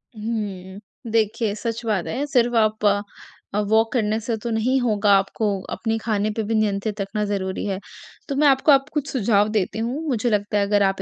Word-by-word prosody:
हुँ, 205 -4 -5 0.3
देखिए 220 -1 +1
सच 230 +2 -4
बात 205 -6 0
है, 270 +5 -2
सिर्फ 245 -4 +2
आप 215 -1 +2 0.8
वॉक 225 +1 +3
करने 220 -3 +1
से 230 +1 -2
तो 235 - -2
नहीं 240 +4 +1
होगा 210 -4 +2
आपको, 195 +3 -2 0.3
अपने 225 -1 -1
खाने 215 -2 -1
पे 220 - 0
भी 225 +2 -1
नियंत्रित 210 0 0
रखना 210 +2 -2
ज़रूरी 190 -2 -2
है, 195 -2 -2 0.5
तो 275 - -1
मैं 295 +1 +4
आपको 275 +2 +4
अब 275 0 +5
कुछ 295 -2 -1
सुझाव 210 -4 +2
देती 215 0 -1
हूँ, 240 +7 -2
मुझे 245 -3 0
लगता 205 -1 0
है 200 - +2
अगर 205 0 +2
आप 195 0 +1
220 Hz, 190 wpm, -22 LUFS, 205-235 Hz, 0.8 s, अब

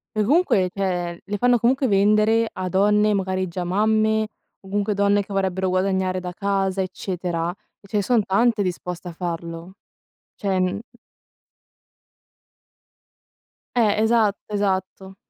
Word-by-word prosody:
E 215 - +2
comunque, 245 - +3
cioè, 180 -3 -2
le 205 +1 -4
fanno 245 +3 +3
comunque 260 +4 +2
vendere 215 +2 +3
a 185 -1 -4
donne, 210 +2 +3
magari 190 -1 -1
già 175 +1 -4
mamme, 215 +3 +2 0.4
o 190 - -15
comunque 205 +1 -1
donne 200 0 +3
che 200 - -14
vorrebbero 190 -1 0
guadagnare 185 0 0
da 180 -1 -6
casa, 195 0 -1
eccetera. 180 -2 -3 0.3
E 200 - -18
ce 210 - -2
ne - - +3
son 230 0 +2
tante 210 +2 +2
disposte 180 0 -4
a - - -6
farlo. 170 0 -6 0.6
Cioè, 190 -2 -1
non 185 +2 0 3.0
Eh, 215 -2 +3
esatto, 220 -2 +2
esatto. 190 -1 -2
195 Hz, 135 wpm, -22 LUFS, 185-210 Hz, 3.0 s, comunque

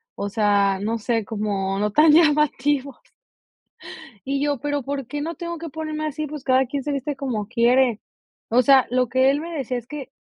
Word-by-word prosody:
o 200 - -3
sea, 200 -2 +2
no 225 +2 -1
sé, 225 0 -1
como 200 -2 -2
no 210 0 0
tan 305 +5 +5
llamativos. 290 -4 +2 1.3
Y 275 0 0
yo: 290 -2 0
"¿pero 290 -1 -2
por 275 -2 -4
qué 290 +2 -4
no 330 +1 -4
tengo 340 +1 -5
que 330 0 -7
ponerme 310 0 -4
así?, 305 0 -4
pues 295 -2 -8
cada 260 0 +3
quien 275 +1 -4
se 295 - -3
viste 280 +1 -3
como 235 -7 -3
quiere". 240 0 +2 0.5
O 245 +3 +4
sea, 265 0 +5
lo 250 0 +1
que 260 +2 +3
él 285 - -1
me 335 +2 -6
decía 255 -2 -3
es 240 0 -8
que 280 -2 -8
265 Hz, 200 wpm, -22 LUFS, 230-295 Hz, 1.3 s, tan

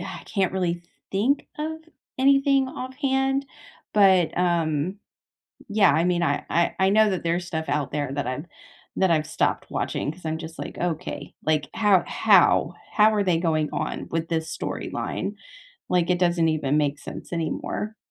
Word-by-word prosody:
I - - -7
can't 190 -3 +1
really 175 -2 -1 0.3
think 240 +9 +1
of 315 +1 -3 0.4
anything 275 0 +4
offhand? 270 +1 -1 0.5
But, 190 -5 +4
um, 170 0 0 0.7
yeah, 205 -7 +4
I 160 +3 +2
mean, 175 -1 +1
I 145 -4 0
I 170 0 +2
I 190 - +4
know 215 0 +5
that 185 - -2
there's 170 +1 0
stuff 160 -2 -3
out 145 -2 -1
there 145 -2 -2
that 145 -2 -2
I've 130 +4 -3 0.5
that 190 -1 +3
I've 155 -2 +2
stopped - - 0
watching 145 - -2
'cause 180 +1 -17
I'm 160 0 -2
just 160 0 -9
like, - - -6
"Okay. 160 -4 -4
Like, 155 -1 +1
how 205 -4 +4
how? - - +4 0.2
How 215 0 +5
are 205 -1 +1
they 180 -3 +2
going 155 -3 0
on - - -3
with 165 0 -2
this 160 -1 -2
storyline? - - -4 0.5
Like, 180 -1 +2
it 180 - +2
doesn't 175 -2 +2
even 150 -2 +1
make 145 -1 0
sense - - -8
anymore." 190 +6 -3
175 Hz, 165 wpm, -25 LUFS, 160-210 Hz, 0.7 s, know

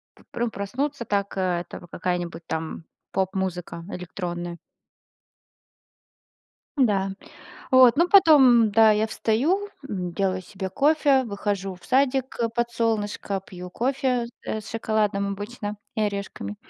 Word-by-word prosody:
п - - -21
пру 240 0 -1
проснуться, 250 +6 -3
так 200 -1 -1
это 180 -2 -2
какая-нибудь 175 -2 -3
там 160 0 -4 0.3
поп-музыка 185 -3 -2
электронная. 175 -1 -5 2.2
Да. 200 -8 +2 0.6
Вот, 255 -1 +7
ну 345 +2 +3
потом, 270 - +7
да, 220 +1 +6
я 215 +1 +1
встаю, 295 - 0 0.2
м, 180 -3 -3
делаю 185 0 0
себе 190 +1 -6
кофе, 285 -1 +3
выхожу 200 -3 -3
в 180 - -18
садик, 265 +1 +1
э, 230 - +2
под 235 +1 -1
солнышко, 210 -4 -1
пью 180 -1 -9
кофе, 255 +1 0 0.2
э, 220 - -3
с 215 - -11
шоколадом 215 -3 0
обычно 205 +1 -5 0.2
и 220 - 0
орешками. 200 - -4
210 Hz, 120 wpm, -25 LUFS, 185-245 Hz, 2.2 s, Вот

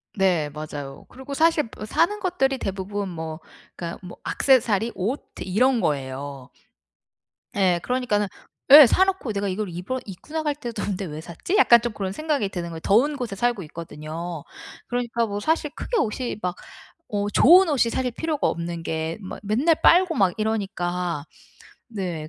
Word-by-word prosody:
네, 180 -7 +2
맞아요. 145 -2 -7
그리고 265 +2 -9
사실 315 -3 +2
뭐 210 - -7
사는 345 - +1
것들이 270 -9 0
대부분 195 0 -4
뭐 160 -2 -6 0.4
그니까 170 -1 -6
뭐 180 -2 -10
액세서리, 235 -4 +2
옷 225 +10 -2 0.2
이런 245 +7 +2
거예요. 135 -2 -3 1.1
예, 185 -3 +3
그러니까는 245 -5 0 0.4
예. 290 0 +12
사놓고 380 - +2
'내가 200 0 -2
이걸 200 +1 -2
입어 180 +10 -4
입고 195 - -11
나갈 310 -2 0
때도 240 -5 -6
없는데 195 -1 -3
왜 155 -2 -6
샀지?' 170 - -4
약간 235 - +7
좀 240 -2 -3
그런 195 -2 -3
생각이 290 -4 -1
드는 175 -3 -5
거예요. 165 -1 -7
더운 260 - +3
곳에 240 -7 -4
살고 235 -1 0
있거든요. 160 0 -7 0.4
그러니까 235 -1 -1
뭐 205 -2 -4
사실 310 +5 0
크게 485 - -2
옷이 240 - -1
막 180 -1 -2 0.6
어 205 0 -1
좋은 350 - +7
옷이 255 -5 +2
사실 255 +1 -1
필요가 310 +4 -1
없는 170 0 -4
게 160 0 -3
막 190 - -7
맨날 245 +11 +2
빨고 360 -1 +5
막 195 - +2
이러니까. 180 -7 -2 0.6
네 180 -8 -4
205 Hz, 325 characters per minute, -24 LUFS, 175-260 Hz, 1.1 s, 예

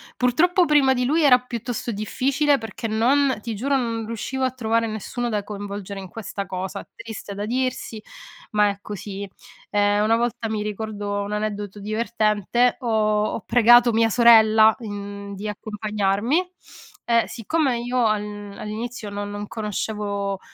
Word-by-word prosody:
Purtroppo, 345 +9 +3
prima 290 -5 +4
di 250 - 0
lui, 300 +6 +2
era 255 -3 +7
piuttosto 240 -1 -4
difficile 275 +7 +1
perché 225 -1 -6
non 260 +4 +2
ti 230 -1 -4
giuro, 275 +6 0
non 230 -4 -1
riuscivo 260 +4 -3
a 255 - 0
trovare 230 -2 0
nessuno 220 +3 -4
da 210 -3 -1
coinvolgere 200 -1 -6
in 190 - -8
questa 200 0 -6
cosa. 190 +1 -5
Triste 220 -3 -8
da 205 - -3
dirsi, 245 -2 -2 0.5
ma 210 -1 +3
è 200 - -4
così. 200 -1 -6 0.4
Ehm, 205 0 +3
una 225 - +4
volta, 235 -1 -1
mi 215 -1 -2
ricordo 205 -1 -3
un 205 - -5
aneddoto 210 -1 -3
divertente, 215 +2 +1
ho 220 -4 +1 0.2
ho - - -4
pregato 240 +1 +6
mia 225 0 +3
sorella, 220 -1 +6
mhmm, 200 -2 -7
di 200 - -7
accompagnarmi. 210 - -1 0.5
E 235 -1 +3
siccome 260 +1 0
io 245 0 0
al 205 -1 -2
all'inizio 220 +1 -5
non 205 0 -5
non 205 0 -5
conoscevo 205 -2 -3
220 Hz, 150 wpm, -23 LUFS, 205-240 Hz, 0.5 s, era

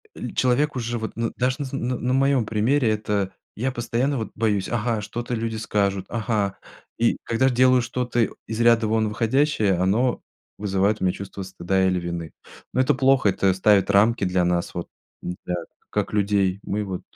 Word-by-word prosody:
э, - - -5
человек 130 +4 +2
уже, 120 -1 -2
вот, 110 - -5
ну, 115 0 -1
даже 125 +1 +1
на 145 - -2
св 135 +1 -4
на 125 +1 -1
на 125 +2 -1
моем 135 -2 +3
примере, 115 +4 +1
это 105 -2 -1 0.2
я 130 +5 -1
постоянно, 125 +3 -1
вот, 110 - -4
боюсь: 105 -3 0
ага, 115 -2 -1
что-то 120 +4 -5
люди 115 -1 -2
скажут, 100 -3 0
ага. 105 -3 -1 0.4
И 115 - +2
когда 115 +3 +1
ж - - +3
делаю 130 +1 +4
что-то, 120 -1 0 0.2
из 110 +1 -3
ряда 115 -1 +4
вон 110 0 +1
выходящее, 115 -1 +1
оно 100 +8 +1 0.4
вызывает 100 +1 +1
у - - -1
меня 90 -1 +2
чувство 100 0 -7
стыда 95 0 0
или 90 -1 +1
вины. 85 -2 -5 0.4
Ну 130 - +3
это 130 - +3
плохо, 135 -4 +4
это 95 0 +2
ставит 100 +1 +3
рамки 105 +3 +4
для 90 -1 +1
нас, 90 +1 0
вот, 85 - -4 0.3
да, 90 0 -4 0.3
как - - -2
людей. 100 -2 +1
Мы 105 +1 -2
вот 95 -3 -5
110 Hz, 185 wpm, -23 LUFS, 100-125 Hz, 0.4 s, делаю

